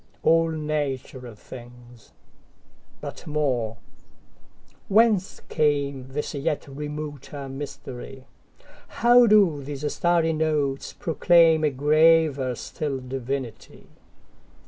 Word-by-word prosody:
All 165 0 +4
natural 140 -6 -4
things! 120 0 -14 0.9
But - - -8
more—Whence 150 - -2
cameThis 140 -2 -1
yet 155 -3 -2
remoter 145 -1 -7
mystery? 135 -1 -8 0.6
How 240 0 +5
do 195 -9 +4
these 145 +1 -4
starry 170 -2 +2
notes 150 -3 -1
proclaimA 165 -1 +3
graver 150 -1 +3
still 145 +3 -4
divinity? 130 -2 -6
145 Hz, 75 wpm, -24 LUFS, 135-160 Hz, 0.9 s, How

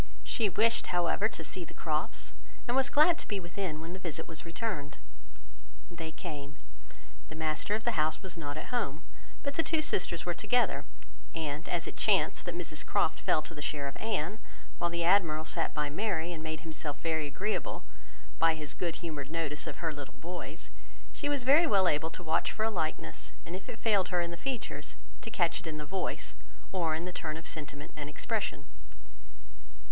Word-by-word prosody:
She 220 -4 +2
wished, 225 +4 +3
however 175 +4 +3
to - - -4
see 185 - -2
the - - -10
Crofts, 155 -1 -1 0.3
and 240 - +2
was 265 -1 +4
glad 315 +3 +6
to - - -6
be 205 - 0
within 175 -2 -3
when 165 +2 -5
the 190 - -5
visit 165 -3 -3
was 165 0 -7
returned. 165 -6 -2 0.9
They 165 -2 -4
came: 145 -2 -6 0.7
the 160 - -7
master 160 +5 +1
of 220 - -2
the 240 - +3
house 155 +4 +1
was 190 - -5
not 145 -3 -4
at 155 - -6
home, 165 - 0 0.4
but 280 - -1
the - - +6
two 320 -1 +2
sisters 170 - +1
were 175 - +1
together; 245 +7 +3 0.5
and 155 0 -2
as 170 -1 +1
it - - -6
chanced - - +4
that - - -1
Mrs - - -1
Croft - - +2
fell 155 - +3
to 165 - -6
the 150 - -7
share 145 -1 -1
of 135 - -5
Anne, 215 -2 -1 0.4
while 175 - +2
the 170 0 0
Admiral 165 -4 +5
sat 165 0 +1
by 150 -1 0
Mary, 175 -1 0
and 160 - -5
made 160 -1 -3
himself 155 -3 -3
very 160 -2 +1
agreeable 200 +9 -1 0.6
by 165 -1 +6
his 150 -3 -4
good 170 -1 -2
humoured 145 -4 -3
notice 155 -2 -1
of - - -4
her 160 - +1
little 145 -2 -7
boys, 175 +1 -6 0.4
she 290 - -1
was 280 -4 +1
well 270 - +7
able 160 0 +3
to 180 - -7
watch 160 0 +2
for 215 - -1
a 225 - +2
likeness, 155 - -2
and 170 - -4
if 190 - -7
it - - -5
failed 205 -6 +4
her 180 - +2
in 170 0 0
the - - -3
features, 170 - -3 0.3
to - - -4
catch 175 -6 +2
it - - -9
in 155 -1 -2
the 150 - -4
voice, 185 +6 -2 0.4
or 170 -4 +2
in 165 +2 -2
the 180 - -4
turn 155 -2 -2
of 165 - -8
sentiment 145 -2 -4
and 145 -1 -4
expression. 200 -5 -1
165 Hz, 200 wpm, -32 LUFS, 155-195 Hz, 0.9 s, well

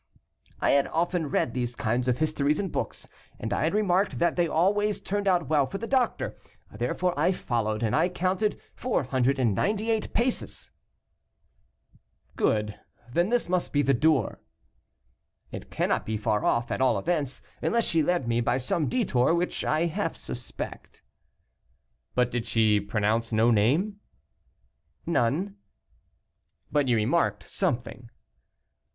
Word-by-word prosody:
"I - - +2
had 140 0 +3
often 170 -1 -1
read 120 - 0
these 125 -1 -2
kinds 120 +2 -1
of 125 -1 +2
histories 150 -1 +1
in 195 -2 -2
books, - - -4 0.3
and 110 - -3
I - - +1
had 165 - 0
remarked 200 -1 +2
that 170 - +2
they 175 -1 +2
always 205 +6 +1
turned 205 0 -2
out 175 -5 +2
well 145 -3 +3
for 195 - -5
the 230 - -5
doctor. 255 -1 0 0.4
Therefore 125 +11 0
I 180 - +2
followed, 115 - -1
and 110 - +1
I 165 +4 +3
counted 185 +4 0
498 140 - 0
paces." 245 +2 -1 1.6
"Good; 105 -1 0 0.3
then 175 +6 +2
this 240 -4 +1
must 180 0 0
be 145 0 +2
the 135 +1 +3
door." 145 -3 +1 1.1
"It - - -8
cannot - - 0
be 110 0 -1
far 105 -1 0
off, 120 0 +1
at - - -1
all 125 -5 +3
events, 145 - -2 0.2
unless 235 0 +1
she 165 - +2
led 165 -4 0
me 115 0 +1
by 120 +1 +1
some 140 +4 -1
detour, 165 - +2
which 175 +1 -1
I 155 +2 +1
half 170 0 -2
suspect." 125 -1 -8 1.1
"But 125 -1 +2
did 120 -1 -2
she 110 -2 +3
pronounce 105 +3 0
no 115 +2 +4
name?" 145 - +2 1.1
"None." 170 - 0 1.1
"But 145 -2 +2
you 120 - +3
remarked 120 +10 +1
something?" 125 -8 -3
150 Hz, 140 wpm, -27 LUFS, 120-180 Hz, 1.6 s, no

